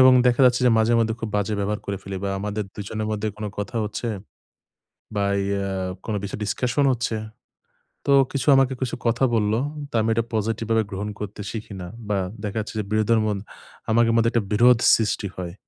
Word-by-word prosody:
এবং 130 Hz, 0 st, +8 dB
দেখা 125 Hz, +1 st, +3 dB
যাচ্ছে 125 Hz, 0 st, +4 dB
যে -, -, +6 dB
মাঝে 110 Hz, +1 st, +3 dB
মধ্যে 115 Hz, -1 st, +1 dB
খুব 115 Hz, -, -3 dB
বাজে 105 Hz, +1 st, 0 dB
ব্যবহার 105 Hz, +1 st, -1 dB
করে 100 Hz, -, -2 dB
ফেলি 95 Hz, 0 st, -5 dB
বা 100 Hz, -, -1 dB
আমাদের 105 Hz, +1 st, -3 dB
দুজনের 105 Hz, +1 st, -4 dB
মধ্যে 110 Hz, 0 st, -1 dB
কোনো 105 Hz, 0 st, -4 dB
কথা 105 Hz, +3 st, -4 dB
হচ্ছে 105 Hz, +3 st, -4 dB, 1.1 s
বা 100 Hz, -1 st, +1 dB, 0.2 s
ইয়া 100 Hz, 0 st, -1 dB, 0.4 s
কোনো 110 Hz, -2 st, -1 dB
বিষয় 100 Hz, +1 st, -5 dB
ডিসকাশন 125 Hz, +7 st, +1 dB
হচ্ছে। 120 Hz, -2 st, -1 dB, 0.9 s
তো -, -, +2 dB, 0.2 s
কিছু 135 Hz, -1 st, -2 dB
আমাকে 135 Hz, -1 st, +4 dB
কিছু 125 Hz, -, -1 dB
কথা 115 Hz, +3 st, +2 dB
বললো, 110 Hz, 0 st, +2 dB, 0.3 s
তা -, -, -5 dB
আমি 110 Hz, -, 0 dB
এটা 115 Hz, +1 st, +1 dB
পসিটিভভাবে 115 Hz, +1 st, 0 dB
গ্রহণ 100 Hz, +2 st, -3 dB
করতে 105 Hz, 0 st, -6 dB
শিখি 110 Hz, -2 st, -6 dB
না। 90 Hz, -, -6 dB, 0.2 s
বা 105 Hz, -, +1 dB, 0.3 s
দেখা 105 Hz, +1 st, -3 dB
যাচ্ছে 105 Hz, -, -5 dB
যে -, -, 0 dB
বিরোধের 110 Hz, +1 st, +3 dB
মন 105 Hz, -2 st, 0 dB, 0.5 s
আমাদের 115 Hz, +1 st, +4 dB
মধ্যে 115 Hz, 0 st, +4 dB
একটা 115 Hz, -3 st, +1 dB
বিরোধ 120 Hz, +3 st, +6 dB, 0.2 s
সৃষ্টি 110 Hz, -2 st, -1 dB
হয়। 90 Hz, -2 st, -5 dB
110 Hz, 190 wpm, -24 LUFS, 105-115 Hz, 1.1 s, এবং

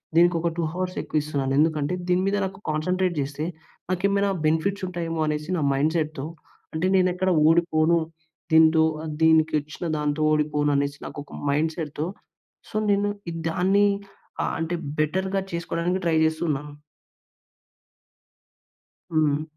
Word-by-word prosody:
దీనికి 175 Hz, +1 st, +5 dB
ఒక 170 Hz, -, +1 dB
2 170 Hz, -, 0 dB
హవర్స్ 185 Hz, 0 st, -3 dB
ఎక్కువిస్తున్నాను. 145 Hz, -3 st, -1 dB
ఎందుకంటే, 155 Hz, 0 st, +1 dB, 0.2 s
దీని 180 Hz, +1 st, +3 dB
మీద 200 Hz, -, +1 dB
నాకు 190 Hz, 0 st, -7 dB
కాన్సంట్రేట్ 180 Hz, +4 st, 0 dB
జేస్తే 145 Hz, +2 st, -3 dB, 0.5 s
నాకేమైనా 200 Hz, +2 st, +1 dB, 0.2 s
బెనిఫిట్స్ 175 Hz, +6 st, +1 dB
ఉంటాయేమో 165 Hz, -2 st, -3 dB
అనేసి 150 Hz, +2 st, -2 dB
నా 155 Hz, -, 0 dB
మైండ్ 150 Hz, +4 st, +1 dB
సెట్‌తో 155 Hz, -3 st, -2 dB, 0.5 s
అంటే 160 Hz, +3 st, -1 dB
నేను 185 Hz, -1 st, +4 dB
ఎక్కడ 185 Hz, +1 st, 0 dB, 0.2 s
ఓడిపోను, 165 Hz, 0 st, +3 dB, 0.6 s
దీంతో 160 Hz, 0 st, +6 dB, 0.2 s
ఆహ్, 155 Hz, -, -4 dB
దీనికిచ్చిన 155 Hz, 0 st, +2 dB
దాంతో 150 Hz, +1 st, -1 dB
ఓడిపోను 150 Hz, -1 st, +1 dB
అనేసి 140 Hz, 0 st, 0 dB
నాకు -, -, -8 dB
ఒక -, -, -15 dB, 0.2 s
మైండ్ 155 Hz, +3 st, +1 dB
సెట్‌తో. 155 Hz, -1 st, -3 dB, 0.6 s
సో -, -, -13 dB, 0.2 s
నేను 205 Hz, +1 st, +2 dB, 0.2 s
ఇ -, -, -6 dB, 0.2 s
దాన్ని 195 Hz, +4 st, +3 dB, 0.6 s
ఆహ్, -, -, -1 dB
అంటే 165 Hz, +2 st, -1 dB, 0.2 s
బెటర్‌గా 190 Hz, +5 st, 0 dB
చేసుకోవడానికి 170 Hz, +2 st, -1 dB
ట్రై 165 Hz, -1 st, +3 dB
చేస్తూ 160 Hz, +1 st, -1 dB
ఉన్నాను. 145 Hz, 0 st, -3 dB, 2.4 s
హ్మ్. 155 Hz, -2 st, +2 dB
160 Hz, 135 wpm, -25 LUFS, 150-180 Hz, 2.4 s, దీంతో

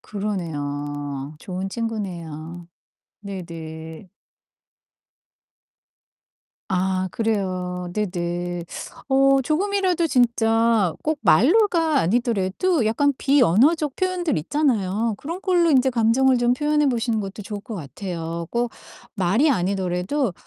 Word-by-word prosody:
그러네요. 145 Hz, -7 st, -4 dB
좋은 185 Hz, +3 st, -5 dB
친구네요. 175 Hz, -7 st, -5 dB, 0.5 s
네네. 165 Hz, -3 st, -8 dB, 2.6 s
아 185 Hz, 0 st, 0 dB
그래요. 185 Hz, -5 st, -2 dB
네네. 175 Hz, -3 st, -2 dB, 0.4 s
어 275 Hz, 0 st, +4 dB
조금이라도 365 Hz, +2 st, +1 dB
진짜 230 Hz, -, +3 dB
꼭 310 Hz, -1 st, -1 dB
말로가 325 Hz, -, +4 dB
아니더라도 235 Hz, -, +1 dB
약간 285 Hz, +6 st, +2 dB
비언어적 280 Hz, -, +3 dB
표현들 365 Hz, -, -1 dB
있잖아요. 225 Hz, -, 0 dB
그런 330 Hz, -, -6 dB
걸로 355 Hz, -4 st, +3 dB
인제 265 Hz, -2 st, +4 dB
감정을 250 Hz, +2 st, +3 dB
좀 240 Hz, 0 st, +3 dB
표현해 295 Hz, +1 st, +2 dB
보시는 230 Hz, -3 st, 0 dB
것도 200 Hz, +1 st, -6 dB
좋을 205 Hz, +1 st, -6 dB
것 220 Hz, +1 st, -7 dB
같아요. 165 Hz, -, -5 dB
꼭 240 Hz, 0 st, -1 dB, 0.4 s
말이 200 Hz, -, +2 dB
아니더라도 190 Hz, +3 st, 0 dB
215 Hz, 235 characters per minute, -23 LUFS, 180-270 Hz, 2.6 s, 어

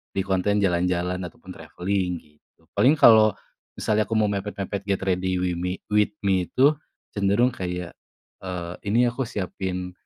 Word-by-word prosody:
di 95 Hz, -, +1 dB
konten 100 Hz, +1 st, +1 dB
jalan-jalan 90 Hz, 0 st, 0 dB
ataupun -, -, -13 dB
travelling 90 Hz, -1 st, -3 dB
gitu. 75 Hz, 0 st, -30 dB
Paling 135 Hz, +4 st, +6 dB
kalau, 110 Hz, -6 st, +7 dB, 0.4 s
misalnya 110 Hz, 0 st, +1 dB
aku 115 Hz, -, -2 dB
mau 105 Hz, -1 st, +3 dB
mepet-mepet 100 Hz, 0 st, -4 dB
get 100 Hz, -1 st, 0 dB
ready 95 Hz, 0 st, 0 dB
wimi 90 Hz, 0 st, -1 dB, 0.2 s
with 105 Hz, 0 st, +3 dB
me 95 Hz, -2 st, +2 dB
itu 140 Hz, +3 st, +4 dB, 0.4 s
cenderung 100 Hz, +5 st, +2 dB
kayak, 90 Hz, -4 st, -5 dB, 0.5 s
eee, 90 Hz, -2 st, -5 dB
ini 120 Hz, +3 st, +3 dB
aku 125 Hz, -1 st, -3 dB
siapin, 90 Hz, -3 st, -4 dB
95 Hz, 145 wpm, -24 LUFS, 90-105 Hz, 0.5 s, kalau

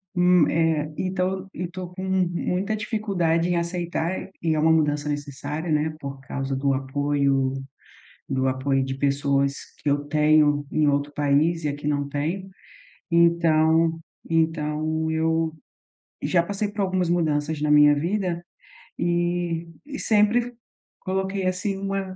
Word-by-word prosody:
Hum, 180 Hz, -3 st, +5 dB
eh, 160 Hz, -2 st, +1 dB
então 190 Hz, +1 st, -1 dB
e 180 Hz, -, -4 dB
tô 180 Hz, 0 st, -7 dB
com 185 Hz, +1 st, -6 dB
muita 190 Hz, +2 st, 0 dB
dificuldade 195 Hz, -7 st, 0 dB
em 175 Hz, -, +1 dB
aceitar, 170 Hz, 0 st, -2 dB, 0.2 s
e 165 Hz, -1 st, +1 dB
é -, -, 0 dB
uma 160 Hz, +1 st, +4 dB
mudança 150 Hz, -2 st, +1 dB
necessária, 145 Hz, +2 st, -4 dB
né, 155 Hz, +1 st, +1 dB
por 140 Hz, -1 st, -6 dB
causa 135 Hz, +1 st, -3 dB
do 135 Hz, +1 st, +1 dB
apoio 135 Hz, 0 st, 0 dB, 0.8 s
do 130 Hz, 0 st, 0 dB
apoio 135 Hz, +1 st, +1 dB
de 135 Hz, 0 st, -3 dB
pessoas 140 Hz, 0 st, +1 dB, 0.2 s
que -, -, -3 dB
eu 145 Hz, 0 st, 0 dB
tenho 150 Hz, -1 st, +3 dB
em 155 Hz, -, +2 dB
outro 145 Hz, 0 st, 0 dB
país 150 Hz, +3 st, +2 dB
e -, -, +1 dB
aqui 145 Hz, +1 st, -3 dB
não 145 Hz, -1 st, 0 dB
tenho. 160 Hz, +7 st, -3 dB, 0.6 s
Então 165 Hz, -1 st, +3 dB, 0.3 s
então 160 Hz, -1 st, 0 dB
eu 160 Hz, 0 st, 0 dB, 0.7 s
já 170 Hz, -2 st, +2 dB
passei 200 Hz, +3 st, -2 dB
por 205 Hz, 0 st, -4 dB
algumas 185 Hz, -2 st, 0 dB
mudanças 155 Hz, -3 st, 0 dB
na 150 Hz, 0 st, +1 dB
minha 150 Hz, 0 st, +7 dB
vida 175 Hz, +2 st, -1 dB, 0.5 s
e 175 Hz, -1 st, -1 dB, 0.2 s
e 285 Hz, -1 st, -7 dB
sempre 225 Hz, +3 st, +2 dB, 0.5 s
coloquei, 190 Hz, +1 st, -2 dB
assim, 185 Hz, +2 st, -1 dB
uma 195 Hz, -1 st, -3 dB
160 Hz, 140 wpm, -24 LUFS, 145-180 Hz, 0.8 s, minha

